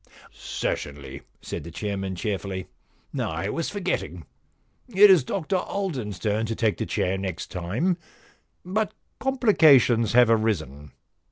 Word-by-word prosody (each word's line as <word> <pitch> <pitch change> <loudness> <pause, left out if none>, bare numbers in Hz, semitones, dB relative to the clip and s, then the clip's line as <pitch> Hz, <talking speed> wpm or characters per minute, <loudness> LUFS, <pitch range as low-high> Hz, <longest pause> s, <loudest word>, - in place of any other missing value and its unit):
* - - -35
Certainly,* 70 +3 -5 0.2
said - - -5
the 85 - -8
chairman 95 +1 -4
cheerfully. 95 -1 -3 0.3
* - - -9
I 85 +5 -2
was 165 +8 -2
forgetting. 95 - -3 0.6
It 205 -3 +7
is 175 -8 +6
Dr 175 +8 -1
Alden's 145 - -3
turn 110 +2 -1
to 115 - -2
take 110 -2 +1
the - - -3
chair 95 +1 -1
next 95 -3 -5
time, 110 - -1 0.7
but 205 +3 -1 0.2
complications 155 - +4
have 120 -1 +6
arisen. 80 - -1
110 Hz, 135 wpm, -25 LUFS, -, 0.7 s, It